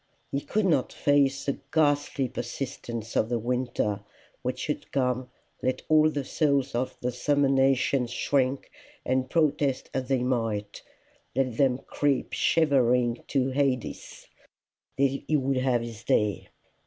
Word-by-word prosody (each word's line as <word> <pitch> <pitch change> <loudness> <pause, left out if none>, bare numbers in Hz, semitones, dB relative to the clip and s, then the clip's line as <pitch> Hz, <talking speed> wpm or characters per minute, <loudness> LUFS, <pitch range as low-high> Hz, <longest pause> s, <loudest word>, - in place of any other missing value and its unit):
He 140 - -1
could 215 +6 0
not 155 -8 +2
face 140 -1 +2
the 140 - -2
ghastly 145 -3 +2
persistence 120 -2 -5
of 110 - +2
the 120 - +1
winter, 120 -3 -1 0.4
which - - -3
would - - -4
come, 125 -1 0 0.3
let 130 - -1
all 155 0 +6
the 145 -2 -3
souls 140 -3 +1
of 130 +2 -2
the 125 - -1
summer 145 +3 +1
nations 135 -1 +2
shrink 130 +1 0 0.3
and 130 0 0
protest 150 -4 +1
as 130 -1 -2
they 130 -2 +1
might; 115 -5 -2 0.5
let 130 -3 0
them 130 -3 +3
creep 140 0 -1
shivering 125 -6 +2
to 135 -1 +1
Hades; 130 -3 -2 0.7
he 140 0 +1
would 135 -1 0
have 130 -2 +2
his 115 -1 -8
day. 105 -3 +1
130 Hz, 135 wpm, -27 LUFS, 125-140 Hz, 0.7 s, all